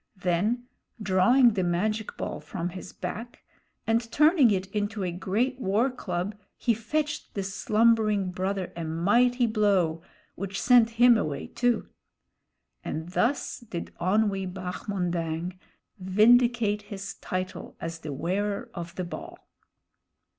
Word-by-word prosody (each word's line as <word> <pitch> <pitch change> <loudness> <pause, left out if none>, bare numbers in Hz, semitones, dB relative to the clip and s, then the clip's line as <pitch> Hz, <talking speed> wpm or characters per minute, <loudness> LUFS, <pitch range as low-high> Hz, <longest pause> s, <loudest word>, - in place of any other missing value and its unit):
Then 200 +7 0 0.3
drawing 225 +5 +4
the 190 -3 0
magic 210 +5 -1
ball - - -4
from 175 -1 -4
his 185 +1 -8
back, 220 +7 -7 0.4
and 230 +1 0
turning 305 -4 +5
it 190 -2 +1
into 210 0 -2
a 180 - -1
great 220 +9 -1
war 230 +4 +1
club, 190 -4 -3 0.2
he 235 - +2
fetched 295 +8 -3
the 200 - -1
slumbering 215 0 +2
brother 190 +1 -3
a 170 - -4
mighty 235 +10 +2
blow, 200 -7 +2 0.3
which 195 +1 -4
sent 240 -2 +5
him 240 -1 +7
away 145 -7 -3
too. 245 -2 0 1.0
And 160 +2 -4
thus 240 +9 0
did 210 -8 -7
Onwee 195 0 +1
Bahmondang 180 -2 -3 0.4
vindicate 215 +2 +4
his 205 -1 -7
title 185 -1 -5
as 165 0 -5
The 155 - -6
Wearer 195 +8 -2
of 170 -2 -7
the 185 - -3
Ball. 175 - -8
200 Hz, 125 wpm, -27 LUFS, 180-230 Hz, 1.0 s, him